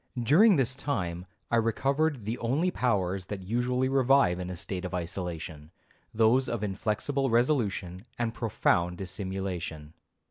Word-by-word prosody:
During 180 - +6
this 130 -3 +1
time, 95 -11 -3 0.2
I 120 - +4
recovered 135 +3 +1
the 115 +3 -3
only 145 +10 +1
powers 95 - 0
that 100 -2 -5
usually 125 +5 0
revive 135 -8 +3
in 90 0 -4
a 90 - -5
state 90 +1 -5
of 90 0 -4
isolation,—those 90 - -2
of 115 -3 -2
inflexible 110 +7 -1
resolution 115 - 0
and 115 -1 -1
profound 90 -6 +1
dissimulation. 95 -5 -5
110 Hz, 130 wpm, -28 LUFS, 90-130 Hz, 0.2 s, During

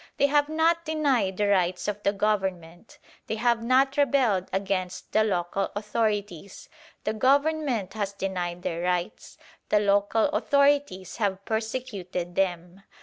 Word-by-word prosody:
They - - +4
have 290 +1 +2
not 330 +2 +2
denied 280 - 0
the 205 - +1
rights 180 -2 +1
of 210 0 -3
the 200 - +2
Government: 190 -3 -2 0.3
they - - -2
have 235 +1 +1
not 265 +3 +2
rebelled 255 -10 +2
against 190 -1 -3
the 215 - +3
local 190 -1 -1
authorities. 205 -3 -3 0.4
The 215 - -1
Government 270 - +1
has 205 -2 -2
denied 180 -3 -4
their 170 0 -3
rights: 180 0 -3 0.3
the 210 - +4
local 205 +3 +2
authorities 285 - +1
have 200 -3 -2
persecuted 220 -6 -4
them. 180 0 -2
205 Hz, 135 wpm, -26 LUFS, 185-255 Hz, 0.4 s, They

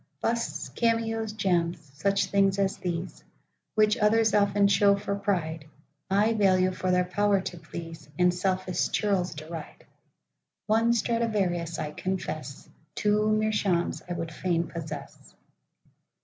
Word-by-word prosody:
Busts, 235 0 -2
cameos, 225 -1 0
gems,—such 175 -2 0
things 195 -1 +2
as 195 -1 0
these, 175 0 -4 0.5
Which 215 +1 +4
others 220 +1 +3
often 200 -1 +4
show 200 0 +4
for 200 0 -3
pride,I 195 +2 -2
value 185 -3 +3
for 185 0 -3
their 180 0 +3
power 205 +2 +2
to 180 - -6
please, 165 -1 -9
And 180 0 +4
selfish 185 0 -1
churls 195 -5 0
deride;—One 170 +7 -4
Stradivarius, 205 -8 0
I 150 -1 -3
confess, 155 -7 -4 0.3
Two 210 +1 +2
Meerschaums, 210 -5 +1
I - - -1
would 165 -1 -4
fain 170 -1 0
possess. 160 -2 -8
190 Hz, 115 wpm, -27 LUFS, 170-210 Hz, 0.5 s, Which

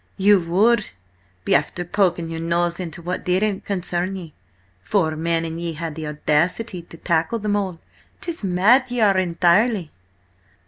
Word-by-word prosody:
"You 200 0 +5
would 200 +6 +2 0.6
be - - +2
after 155 +5 +1
poking 175 -3 +1
your 165 0 -5
nose 170 +1 0
into 170 -2 -6
what 180 +2 -3
didn't 190 +2 0
concern 185 -1 -2
ye. 170 -5 -8 0.5
Four 160 - +1
men, 165 +1 0
and 165 +1 -5
ye 170 -1 -3
had 165 0 -5
the 155 0 -6
audacity 170 +7 0
to 165 0 -14
tackle 165 +6 0
them 210 -1 -1
all? 190 -5 -2 0.4
'Tis 335 -8 -5
mad 205 +8 +4
ye 245 0 -2
are 200 -3 +4
entirely!" 180 +2 +2
180 Hz, 155 wpm, -22 LUFS, 165-200 Hz, 0.6 s, You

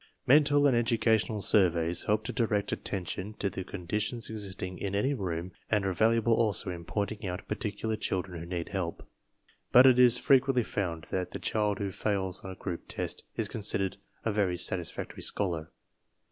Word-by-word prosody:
Mental 145 +1 +5
and 135 -4 +4
educational 110 -2 +2
surveys 85 -5 +2
help 105 +1 +1
to - - -4
direct 110 -5 0
attention 95 +2 -4
to 100 -2 -2
the 95 - -5
conditions 105 +6 -3
existing 95 -4 -5
in 100 0 -3
any 130 +8 +1
room 90 -6 -3 0.2
and 105 -3 +1
are 95 - 0
valuable 115 +3 +3
also 110 -5 +1
in 85 -1 -7
pointing 105 +2 -3
out 90 +1 -5
particular 110 +1 -2
children 95 -4 -3
who 85 - -7
need 85 -2 -4
help. 90 -4 -4 0.6
But 125 +2 +8
it 130 -2 +6
is 125 -1 +7
frequently 135 -2 +3
found 85 -7 -3
that 90 -1 -1
the - - -3
child 105 -2 0
who 100 -1 -3
fails 95 -2 -2
on 95 - -6
a 95 - -7
group 90 -2 -5
test - - -4
is - - 0
considered 100 -2 0 0.3
a 110 - +2
very 100 -4 +1
satisfactory 90 -1 -2
scholar. 85 -6 -1
100 Hz, 175 wpm, -30 LUFS, 90-110 Hz, 0.6 s, But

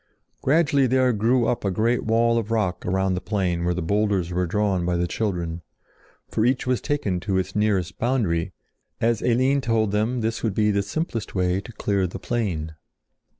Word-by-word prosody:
Gradually 140 -2 +3
there 130 0 +3
grew 115 +3 +2
up 120 - -1
a 100 - +1
great 115 +5 +1
wall 115 +1 +2
of 110 -1 -5
rock 105 -7 -1
around 95 +1 +1
the 90 - -2
plain 90 -4 -1
where 90 0 0
the 90 - -2
boulders 100 -1 0
were 90 0 0
drawn 100 -1 0
by 90 0 0
the 85 - +1
children, 85 -4 -2 0.7
for 110 - -1
each 125 +3 +1
was 125 -1 0
taken 125 - -1
to 95 +1 -1
its 95 +1 -2
nearest 100 -4 0
boundary, 100 -8 0 0.5
as 115 -1 +1
Eline 130 +3 +2
told 110 -4 +1
them 110 +4 0
this 115 +1 -2
would 110 -4 -1
be 105 -1 +3
the 100 0 +1
simplest 115 - -4
way 90 0 +1
to 110 - -11
clear 100 -3 0
the 90 - -7
plain. 90 -10 -2
105 Hz, 190 wpm, -24 LUFS, 90-115 Hz, 0.7 s, Gradually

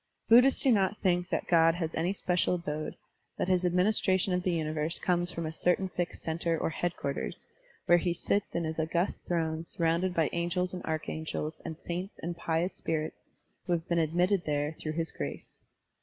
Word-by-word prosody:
Buddhists 250 +4 +7
do 265 - +5
not 205 -1 +2
think 180 -1 +1
tl^at - - -1
God 165 -1 +5
has 165 -2 -3
any 170 +3 0
special 180 -2 +1
abode, 155 -3 -4 0.4
that - - -1
his 185 -1 +2
administration 185 +1 +3
of 180 - +1
the 185 - -1
universe 155 -1 -1
comes 175 -1 +1
from 170 - -4
a 155 - -4
certain 180 +3 +1
|ixed 175 -1 -3
center 165 +1 -1
or 160 - -1
headquarters, 160 -4 -3 0.4
where 175 0 +6
he 175 - 0
sits 200 +4 -1
in 170 - 0
hip 160 0 -3
august 170 +4 -1
throne 160 -2 -1
surrotmded 170 +2 0
by 160 -3 +3
angels 180 +2 -1
and 180 - -5
archangels 155 0 -3
and 160 -2 -6
saints 180 +4 -5
and 170 +1 -3
pious 170 +2 -1
spirits 155 -1 -3 0.4
who 175 - +2
have 165 0 -2
been 170 -1 +2
admitted 175 +4 +2
there 145 +1 0
through 155 - -3
his 165 0 -2
grace. 70 -1 -6
170 Hz, 185 wpm, -30 LUFS, 160-180 Hz, 0.4 s, Buddhists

